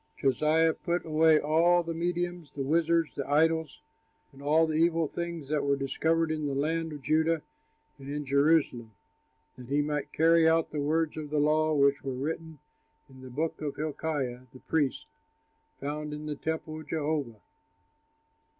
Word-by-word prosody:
Josiah 155 +5 +2
put 175 +1 -2
away 160 0 +4
all 170 +4 +3
the 165 0 -4
mediums, 175 -1 -3
the 140 - -3
wizards, 165 +2 +1
the 140 -1 -5
idols 160 +1 +1 0.5
and 135 - -14
all 155 +3 +3
the 160 - -3
evil 165 0 +2
things 170 -2 -5
that 150 -1 0
were 140 0 +2
discovered 160 +4 0
in 155 -1 -2
the 140 - -2
land 160 +3 -1
of 145 -2 -8
Judah 160 +3 +1 0.6
and 135 0 -9
in 145 0 -4
Jerusalem, 140 -5 +2 0.7
that 125 - -10
he 145 +2 +1
might 150 -1 -3
carry 165 0 +4
out 165 0 +1
the 150 - -2
words 155 +2 0
of 150 -2 -5
the 150 - -1
law 155 +1 +2
which 140 0 +3
were 135 -2 -3
written 160 +3 -4 0.5
in 130 0 -14
the 130 - -10
book 155 +6 -2
that 150 -2 -4
Hilkiah, 145 -5 -3
the 130 - -14
priest, 145 -5 -1 0.7
found 150 +1 -4
in 150 +1 -8
the 150 - -3
temple 155 +1 -4
of - - -14
Jehovah. 145 -8 -2
155 Hz, 170 wpm, -29 LUFS, 140-160 Hz, 0.7 s, away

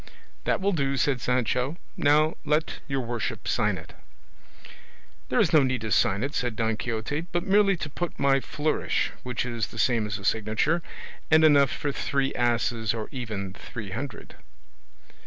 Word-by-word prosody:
"That - - +1
will 200 +1 +1
do," 140 -6 0
said 130 -1 +1
Sancho; 125 +4 0 0.2
"now 150 +2 +3
let 155 +1 0
your 135 -2 -1
worship 120 -2 -4
sign - - +1
it." - - -11 1.4
"There - - +2
is - - +3
no 155 - +7
need 130 -3 0
to 110 -1 -4
sign 95 +2 +3
it," 140 +2 -2
said 120 -6 -1
Don 110 0 0
Quixote, 120 +9 -3
"but 175 0 0
merely 200 -1 +4
to 155 - -4
put 170 +3 -4
my 135 -1 +3
flourish, 150 +3 -1
which 125 -1 -3
is 115 -3 -2
the - - -12
same 115 -2 +2
as 100 -1 -3
a 100 - -10
signature, 110 - +1 0.5
and 160 0 +6
enough 145 -3 +6
for 145 - -2
three 140 0 -1
asses, 120 -2 +1
or 110 -1 -5
even 105 -7 -4
three 105 0 -8
hundred." 125 +1 -6
130 Hz, 170 wpm, -26 LUFS, 115-150 Hz, 1.4 s, no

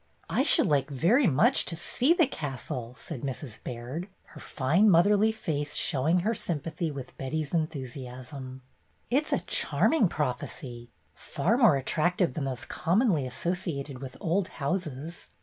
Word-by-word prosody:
"I - - +2
should - - +5
like 140 -1 +1
very 190 - +3
much 190 - +4
to 170 - -2
see 245 - +1
the 340 -1 +5
castle," 130 - -5
said 125 - -7
Mrs. 130 -3 -6
Baird, 125 +9 -5 0.2
her - - -12
fine 160 +10 +2
motherly 205 +5 +5
face 150 -9 -3
show 135 +1 +1
ing 175 +2 +4
her 220 +5 +1
sympathy 165 -3 -3
with 135 -3 -8
Betty's 145 +3 -3
enthusiasm. 130 -4 -5 0.5
"It 285 +5 +2
's - - -1
a - - +2
charming 310 -11 +2
prophecy, 125 -4 -4 0.2
far 170 +10 -1
more 230 - +5
attract 155 +6 0
ive 180 -4 +2
than 155 -4 -3
those 130 -2 -4
commonly 175 - +1
associated 145 -3 -3
with 130 -1 -8
old 175 +3 0
houses. 155 0 -4
155 Hz, 150 wpm, -28 LUFS, 130-180 Hz, 0.5 s, should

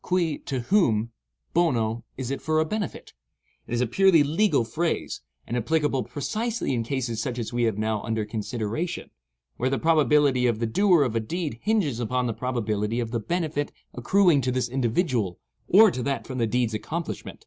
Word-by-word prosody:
Cui, 170 -5 0
to 130 -2 -3
whom; 115 - +2 0.4
bono, 120 -9 +1
is 130 0 -4
it 140 - -3
for 155 0 +1
a 155 - +2
benefit. 205 +1 -4 0.5
It - - -6
is 120 - 0
a - - +3
purely 170 +5 +4
legal 155 - +2
phrase, 165 +9 -2 0.2
and 120 - -4
applicable 145 +2 +1
precisely 220 - -2
in 120 - 0
cases 120 -2 -2
such 125 +1 -3
as 120 -1 -4
we 120 0 +1
have 110 -3 0
now 110 -1 -1
under 110 -2 -2
consideration, 115 - -4 0.5
where 130 - 0
the 135 - 0
probability 150 -5 +3
of 115 -3 +1
the 115 - -1
doer 175 - +4
of 120 -4 -2
a - - +3
deed 150 0 -4
hinges 195 - +1
upon 125 +2 0
the 115 - -1
probability 110 -2 -2
of 115 -2 -3
the 120 - -1
benefit 155 +1 -2 0.2
accruing 170 - +3
to 130 0 0
this 125 -1 0
individual 120 - 0 0.3
or 210 +2 +7
to 125 - -4
that 140 +2 -2
from 130 -2 -5
the 115 - +2
deed's 120 0 0
accomplishment. 165 +10 -5
130 Hz, 185 wpm, -25 LUFS, 115-160 Hz, 0.5 s, or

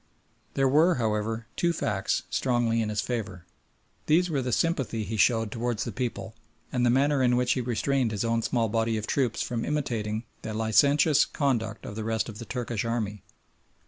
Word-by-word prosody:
There 135 0 +3
were, 155 +6 +4
however, 110 0 -1
two 170 -1 +1
facts 105 -10 -1
strongly 120 -3 +1
in 110 - -1
his 105 -1 -1
favour. 105 -8 -4 0.6
These 175 +3 +3
were 140 -3 0
the 125 -1 -2
sympathy 130 -7 0
he 110 +2 -4
showed 115 0 +2
towards 120 -1 -2
the - - -4
people, 120 -2 -4 0.4
and 125 -1 0
the 120 - +4
manner 140 +3 +3
in 125 -1 +3
which 125 0 +1
he 130 - +1
restrained 125 +2 0
his 110 0 -2
own 115 0 +1
small 115 0 0
body 115 +1 0
of 110 - -3
troops 125 -4 0
from 120 -2 -3
imitating 115 -7 -2 0.2
the 110 - -5
licentious 140 +7 +4
conduct 115 -7 -1
of 105 - -7
the 110 - -4
rest 110 +1 -1
of 110 0 -9
the 115 - -7
Turkish 120 -3 -3
army. 110 -4 -2
115 Hz, 185 wpm, -27 LUFS, 110-130 Hz, 0.6 s, were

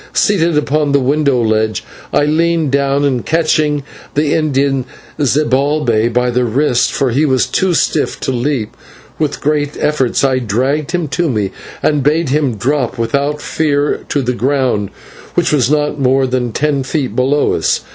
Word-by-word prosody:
Seated 170 -6 +2
upon 150 0 0
the 140 - +4
window 140 0 +1
ledge 110 0 0 0.3
I 145 - +2
leaned 165 -1 +1
down, 140 +1 +1
and 130 -4 0
catching 155 -3 +1 0.3
the 145 0 +1
Indian 140 -4 +1 0.3
Zibalbay 140 -4 +1
by 125 +1 +1
the 125 +1 +1
wrists, 125 +2 +1
for 135 -3 0
he 140 +6 +1
was 130 -4 +2
too 185 -2 0
stiff - - 0
to - - -1
leap, 125 -3 -2 0.4
with 150 -2 -2
great 145 0 -1
efforts 135 -5 0
I 130 -2 +2
dragged 130 +7 -1
him 175 -3 -1
to 170 +3 0
me, 105 -6 -1 0.3
and 150 -2 +2
bade 150 +2 +1
him 140 -4 +1
drop 125 +4 -1
without 140 +6 -1
fear 145 -2 0
to 140 - 0
the 125 0 -1
ground, 125 -5 0 0.5
which - - +2
was 135 -5 +2
not 150 0 0
more 135 0 +2
than 125 -2 -1
ten 145 +3 0
feet 130 -3 -3
below 135 +4 +2
us. - - 0
140 Hz, 165 wpm, -15 LUFS, 125-150 Hz, 0.5 s, the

